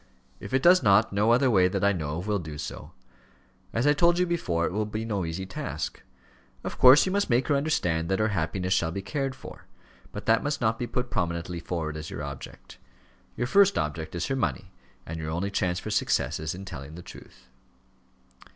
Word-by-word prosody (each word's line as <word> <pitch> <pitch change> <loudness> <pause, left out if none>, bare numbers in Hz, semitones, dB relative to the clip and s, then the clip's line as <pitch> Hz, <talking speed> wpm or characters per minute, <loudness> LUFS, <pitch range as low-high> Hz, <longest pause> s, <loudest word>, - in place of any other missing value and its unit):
"If - - -9
it 130 0 +1
does 180 +1 +7
not, 100 +1 +4
no 105 +3 +2
other 125 +2 +4
way, 95 -4 +5
that 95 +1 -2
I 100 - +5
know 75 -4 -3
of, 90 - -5
will 105 -1 0
do 75 -3 -7
so. - - -7 0.8
As 115 +4 0
I 145 - +5
told 170 +3 +3
you 180 - +3
before, 90 - -1
it - - -2
will 105 +2 -1
be 110 +1 -4
no 100 -5 -2
easy 80 +4 -4
task. 95 - -5 0.6
Of - - -6
course 130 +3 +8
you 185 - -1
must 200 -2 0
make 125 +3 +2
her 145 - +4
understand 90 - 0
that 95 - +1
her 110 +2 +1
happiness 90 0 -1
shall 85 -3 +1
be 95 +3 -5
cared 135 +2 -2
for; - - -12 0.5
but - - -7
that 115 0 +4
must 145 0 -2
not 110 -1 0
be 120 - -2
put 125 0 -3
prominently 85 0 -2
forward 80 -3 -4
as 80 0 -7
your 75 - -6
object. 70 -1 -9 0.6
Your 120 - 0
first 200 +9 +4
object 80 +2 -3
is 85 - -1
her 135 - -1
money, 80 - -2 0.3
and 80 +1 -6
your 80 -1 -4
only 90 +5 -2
chance 90 -3 0
for - - -6
success - - 0
is 80 +2 -3
in 95 +1 -8
telling 75 -4 -8
the 85 - -9
truth." 65 - -14
100 Hz, 215 wpm, -27 LUFS, 85-125 Hz, 0.8 s, course